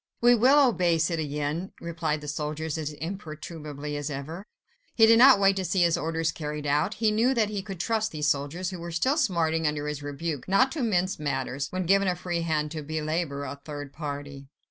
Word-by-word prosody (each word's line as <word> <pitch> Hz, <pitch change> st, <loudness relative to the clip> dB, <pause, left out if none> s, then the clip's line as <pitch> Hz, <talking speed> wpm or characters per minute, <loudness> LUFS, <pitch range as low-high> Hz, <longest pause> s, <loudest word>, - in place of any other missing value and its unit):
"We 240 Hz, +1 st, +6 dB
will 265 Hz, +4 st, +5 dB
obey, 175 Hz, -7 st, +2 dB
citoyen," 155 Hz, +1 st, -2 dB
replied 165 Hz, -3 st, -2 dB
the 150 Hz, -, -8 dB
soldiers 150 Hz, +1 st, -3 dB
as 155 Hz, -2 st, -3 dB
imperturbably 155 Hz, -3 st, -6 dB
as 145 Hz, 0 st, -3 dB
ever. 155 Hz, +8 st, -6 dB, 0.5 s
He 225 Hz, -, +7 dB
did 225 Hz, +1 st, +6 dB
not 260 Hz, -3 st, +8 dB
wait 195 Hz, -1 st, +4 dB
to 190 Hz, -, -1 dB
see 185 Hz, 0 st, +2 dB
his 170 Hz, -1 st, +3 dB
orders 165 Hz, 0 st, -1 dB
carried 150 Hz, -1 st, -5 dB
out: 150 Hz, +9 st, +1 dB
he 220 Hz, -1 st, +2 dB
knew 235 Hz, +5 st, +2 dB
that 215 Hz, -3 st, +1 dB
he 205 Hz, -2 st, -2 dB
could 195 Hz, -3 st, -8 dB
trust 220 Hz, +1 st, 0 dB
these 150 Hz, -1 st, -3 dB
soldiers—who 170 Hz, +6 st, -1 dB
were 170 Hz, +1 st, -6 dB
still 255 Hz, -, +1 dB
smarting 165 Hz, -, +1 dB
under 150 Hz, 0 st, -2 dB
his 150 Hz, -1 st, -4 dB
rebuke—not 165 Hz, -, 0 dB
to 310 Hz, -, -3 dB
mince 185 Hz, -7 st, 0 dB
matters, 135 Hz, -1 st, -2 dB
when 185 Hz, 0 st, -3 dB
given 195 Hz, +2 st, +3 dB
a 180 Hz, -, +1 dB
free 175 Hz, -1 st, -3 dB
hand 155 Hz, -2 st, -1 dB
to 155 Hz, -1 st, -4 dB
belabour 155 Hz, -1 st, -2 dB
a 140 Hz, 0 st, -7 dB
third 145 Hz, -2 st, -7 dB
party. 145 Hz, -2 st, -6 dB
165 Hz, 195 wpm, -27 LUFS, 150-190 Hz, 0.5 s, not